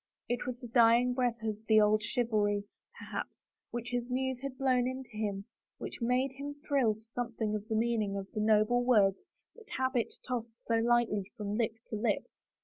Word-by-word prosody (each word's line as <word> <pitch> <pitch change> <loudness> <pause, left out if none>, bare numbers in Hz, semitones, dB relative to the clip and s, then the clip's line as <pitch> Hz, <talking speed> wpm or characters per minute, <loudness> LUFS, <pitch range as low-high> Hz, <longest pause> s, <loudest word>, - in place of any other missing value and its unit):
It 245 +1 -2
was 250 -1 -4
the 245 - -8
dying 235 +1 +5
breath 245 -3 0
of 215 -2 -1
the 220 -1 +6
old 215 0 +4
chivalry, 210 -3 +1 0.3
per - - -9
haps, - - -6 0.2
which 240 0 -4
his 245 0 -2
muse 260 0 -1
had 275 -2 -5
blown 255 -2 +2
into 260 -1 -5
him 200 -2 -2 0.3
which - - -7
made 250 +3 +2
him 280 +2 -6
thrill 255 -7 +3
to 220 - -17
something 230 -3 -2
of 210 0 -3
the 220 - -1
meaning 220 -3 +1
of 195 - -4
the 215 - -2
noble 215 +3 +4
words 205 -6 +3 0.3
that 460 -3 -16
habit 260 -3 0 0.2
tossed 235 -2 -3
so 230 - 0
lightly 230 -4 +2
from 205 -1 -3
lip 225 -1 0
to 215 - -3
lip. 210 -1 0
235 Hz, 190 wpm, -32 LUFS, 215-250 Hz, 0.3 s, the